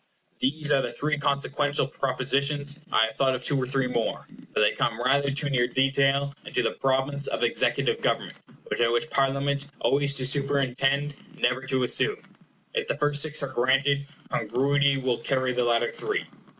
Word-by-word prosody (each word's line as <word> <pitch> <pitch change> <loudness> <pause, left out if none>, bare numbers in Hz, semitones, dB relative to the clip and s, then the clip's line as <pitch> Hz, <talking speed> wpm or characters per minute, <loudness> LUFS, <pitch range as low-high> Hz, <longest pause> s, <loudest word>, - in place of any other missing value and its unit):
These 150 +3 +1
are 135 - +4
the - - -3
three 150 0 -1
consequential 145 0 0
propositions 140 +2 -1
I 110 - +4
have 110 - -7
thought 130 -1 +2
of 125 - -6
two 145 - +1
or 130 -2 -1
three 135 0 +1
more, 120 -2 -2 0.3
but - - 0
they 105 - +4
come 115 -1 -1
rather 140 +3 +2
too 140 +1 -1
near 120 -2 +2
detail, 135 +1 +1
and - - -10
to - - +2
the - - +1
province 135 +1 -1
of - - -3
ecutive - - +1
government, - - -1 0.3
which - - -3
I 120 - +4
wish 120 +6 0
Parliament 140 +1 0
always 140 0 +1
to 130 - -1
superintend, 140 +1 +1 0.2
never 125 +1 +1
to 130 -1 0
assume. 420 - +2 0.6
If 470 -2 -2
the - - -2
first 145 -1 +2
six 155 -1 +2
are 140 - -3
granted, 135 +3 +1 0.2
congruity 140 +5 +1
will 130 -3 -1
carry 130 +1 0
the 125 0 0
latter 120 0 +1
three. - - -3
135 Hz, 180 wpm, -26 LUFS, 130-140 Hz, 0.6 s, are